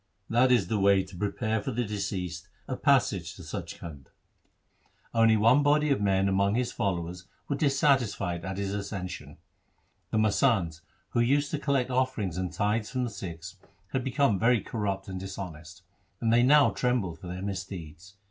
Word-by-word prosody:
That 125 +3 +4
is 120 -6 +4
the 110 -2 0
way 100 -1 +4
to 95 - -12
prepare 105 +3 -1
for 100 - -4
the 120 -1 -1
deceased 95 -3 -4 0.2
a - - -2
passage - - +2
to - - -11
Sach - - -5
Khand.' 75 -5 -10 1.1
Only 115 -1 +5
one 115 +7 +5
body 150 +1 +3
of 135 - +1
men 95 -1 +2
among 100 +1 +2
his 125 0 0
followers 90 -3 -3 0.2
were 140 - -1
dissatisfied 135 - +1
at 95 0 -4
his 100 0 -2
accession. 90 -7 -5 0.7
The - - -1
masands, 105 - +2 0.3
who - - -1
used 140 +4 +2
to 150 - -1
collect 135 -3 0
offerings 125 -9 0
and 90 -1 -2
tithes 105 +4 0
from 130 -1 -2
the 120 - -3
Sikhs, 90 -1 -8 0.3
had 130 -1 -2
become 130 -6 +2
very 120 +1 +4
corrupt 100 -3 -3
and 95 -1 -5
dishonest, 85 -4 -8 0.4
and 115 0 +1
they 120 - +5
now 145 +3 +6
trembled 110 -10 -1
for 90 - -9
their 90 +2 -5
misdeeds. 95 -2 -7
100 Hz, 170 wpm, -28 LUFS, 95-125 Hz, 1.1 s, now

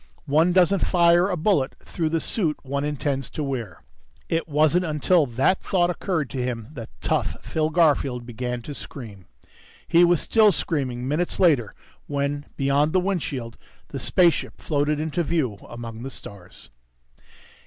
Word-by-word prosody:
One 155 +4 +3
doesn't 185 +1 +3
fire 175 +1 +4
a 180 - -1
bullet 155 -6 +1
through 165 -3 -2
the 165 +1 0
suit 160 -2 -1
one 140 +1 -2
intends 145 -2 -2
to 155 - -4
wear.... 120 - -5 0.5
It 165 0 -1
wasn't 155 +4 +3
until 155 0 +2
that 130 +10 +1
thought 175 -2 +1
occurred 170 -5 -2
to 135 -2 -3
him 120 -3 -4
that 120 -7 -8
tough - - -1
Phil 155 -1 -1
Garfield 145 -7 +2
began 125 0 -4
to 145 - -7
scream. 110 - -9 0.6
He 170 +1 +5
was 175 -2 +4
still 220 -2 +4
screaming 130 -6 -2
minutes 160 +5 -1
later 145 - +3 0.3
when, 145 0 -2
beyond 140 +2 +2
the 185 - +4
windshield, 145 -11 -3 0.3
the 140 - -5
spaceship 170 +8 +2
floated 150 0 0
into 160 +2 -1
view 145 -11 -1
among 115 -1 -8
the 135 - -5
stars. 100 -8 -11
150 Hz, 155 wpm, -24 LUFS, 125-170 Hz, 0.6 s, He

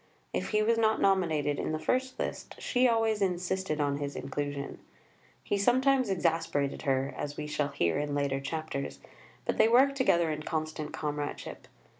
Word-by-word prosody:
If - - -2
he 215 0 +2
was 230 +1 +2
not 220 -1 +3
nominated 160 -7 +2
in - - -2
the - - 0
first 255 +9 -1
list, - - -4
she 250 0 +2
always 225 -2 +2
insisted 185 -3 -1
on 145 -1 +1
his 145 0 -4
inclusion. 140 0 -4 0.6
He 200 - 0
sometimes 260 +3 +3
exasperated 165 -6 0
her, 135 0 0
as 145 0 -5
we 150 - -3
shall 150 -1 -1
hear 85 - 0
in 145 -1 -2
later 140 -1 0
chapters, 140 0 -4 0.5
but - - -1
they - - +7
worked 270 +4 +5
together 170 - +3
in 155 0 -3
constant 155 -1 -3
comradeship. 150 -1 -4
160 Hz, 165 wpm, -30 LUFS, 145-215 Hz, 0.6 s, they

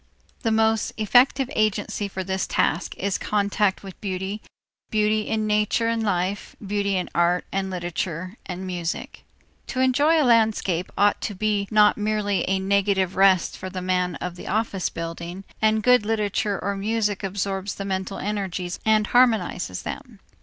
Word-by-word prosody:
The 230 - 0
most 220 0 +2
effective 250 +4 +4
agency 210 -1 0
for 190 -1 -5
this 190 0 -2
task 170 +5 0
is 195 0 -1
contact 205 -1 0
with 195 -2 -11
beauty, 195 +1 -3 0.5
beauty 215 0 +1
in 220 -1 0
nature 210 +2 +1
and 230 0 0
life, 195 -1 -1
beauty 200 -1 -1
in 180 - -2
art 175 +1 +2
and 195 0 -1
literature 180 0 -4
and 185 0 -5
music. 175 -2 -4 0.4
To 255 - -4
enjoy 285 +5 +4
a 300 - +3
landscape 220 -7 +2
ought 205 +1 +3
to 205 - -3
be 205 0 0
not 210 -1 +5
merely 210 -2 0
a 190 - +2
negative 190 -1 +1
rest 190 -2 +4
for 185 - -6
the 185 0 -5
man 180 -1 0
of 180 0 -5
the - - -9
office 205 -3 -1
building, 170 +3 -6 0.2
and 220 0 +3
good 250 -3 +5
literature 210 -1 0
or 200 +1 -2
music 210 0 -1
absorbs 195 0 -2
the 195 - -5
mental 190 0 -3
energies 190 -3 -3
and 215 -1 +3
harmonizes 215 - +2
them. - - -7
200 Hz, 160 wpm, -24 LUFS, 185-215 Hz, 0.5 s, not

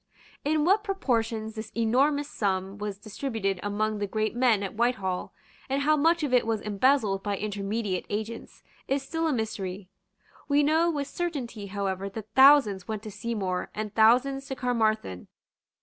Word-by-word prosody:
In 300 +1 +1
what 400 +4 +4
proportions 225 - -1
this 220 0 -7
enormous 275 +6 +2
sum 195 -5 -2
was 205 -1 -4
distributed 215 -2 -3
among 210 +1 -1
the 205 - -1
great 215 +3 -1
men 240 -5 +3
at 195 - -4
Whitehall, 205 -6 -1 0.4
and 275 +1 0
how 305 +1 +4
much 325 +2 +2
of 280 -4 -1
it 245 -2 +4
was 225 -1 0
embezzled 210 -1 +2
by 205 0 -2
intermediate 205 -1 -3
agents, 220 +2 -5 0.2
is 275 0 0
still 325 +4 -2
a - - +1
mystery. 200 -6 -3 0.6
We 290 0 +3
know 320 +3 +3
with 290 -4 -1
certainty 260 -13 -4
however 195 -1 -3
that 215 +1 -9
thousands 265 -9 +6
went 215 -1 -4
to 215 - -7
Seymour 195 -5 -3
and 215 -1 -4
thousands 255 +5 +3
to 265 - -4
Caermarthen. 220 - -1
220 Hz, 160 wpm, -27 LUFS, 205-275 Hz, 0.6 s, thousands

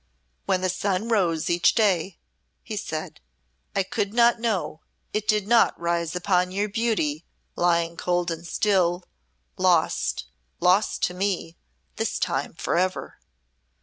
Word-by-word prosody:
"When 190 -2 +1
the 185 - 0
sun 195 +4 -1
rose 170 -7 +1
each 175 0 +3
day," 190 -5 +1 0.5
he - - -6
said, - - -5 0.5
"I 195 - +2
could 200 +3 -3
not 235 -1 +5
know 205 -9 -2 0.3
it 210 0 -2
did 210 -2 +2
not 235 0 +4
rise 170 -1 -1
upon 180 0 +1
your 200 +2 -1
beauty, 205 -9 -1 0.3
lying 170 -1 +1
cold 175 -1 0
and 165 +1 -6
still, 180 -2 +1 0.5
lost - - +1 0.3
lost 185 +4 +2
to 180 - +1
me 180 -3 -2 0.4
this - - -1
time, - - -2
forever." 185 +2 -1
185 Hz, 130 wpm, -25 LUFS, 170-205 Hz, 0.5 s, not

